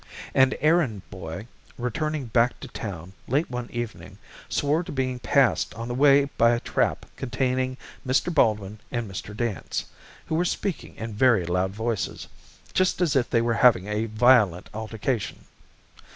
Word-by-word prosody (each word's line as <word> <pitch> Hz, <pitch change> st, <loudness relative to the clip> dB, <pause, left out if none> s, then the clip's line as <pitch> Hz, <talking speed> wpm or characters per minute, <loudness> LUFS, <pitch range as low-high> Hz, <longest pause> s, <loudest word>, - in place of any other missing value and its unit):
An 130 Hz, 0 st, +4 dB
errand 150 Hz, -, +2 dB
boy, 90 Hz, 0 st, -7 dB, 0.3 s
returning 145 Hz, +4 st, -2 dB
back 120 Hz, +1 st, +2 dB
to -, -, -7 dB
town, 95 Hz, -5 st, -7 dB
late 145 Hz, +5 st, 0 dB
one 125 Hz, -1 st, -4 dB
evening, 120 Hz, -1 st, -6 dB, 0.3 s
swore 145 Hz, +3 st, +1 dB
to -, -, -8 dB
being 130 Hz, -2 st, -2 dB
passed 135 Hz, -3 st, +2 dB
on 115 Hz, +1 st, -5 dB
the 120 Hz, -, -3 dB
way 140 Hz, +2 st, +6 dB, 0.2 s
by 115 Hz, +1 st, +6 dB
a -, -, -2 dB
trap -, -, 0 dB
containing 130 Hz, 0 st, -1 dB, 0.3 s
Mr. 135 Hz, +7 st, +1 dB
Baldwin 105 Hz, -7 st, +1 dB
and 120 Hz, -3 st, -2 dB
Mr. 100 Hz, +2 st, -7 dB
Dance, 115 Hz, -7 st, -2 dB, 0.4 s
who -, -, -4 dB
were 165 Hz, +2 st, +2 dB
speaking 180 Hz, +1 st, -3 dB
in 115 Hz, 0 st, -6 dB
very 110 Hz, -4 st, +4 dB
loud 90 Hz, +2 st, 0 dB
voices 110 Hz, -1 st, -3 dB, 0.5 s
just 185 Hz, -1 st, +2 dB
as 170 Hz, -6 st, +2 dB
if 125 Hz, -3 st, +2 dB
they 115 Hz, -2 st, +2 dB
were 115 Hz, 0 st, +1 dB
having 110 Hz, -7 st, +6 dB
a 105 Hz, +1 st, -1 dB
violent 110 Hz, -5 st, +3 dB
altercation. 110 Hz, 0 st, -3 dB
120 Hz, 155 wpm, -25 LUFS, 105-130 Hz, 0.5 s, way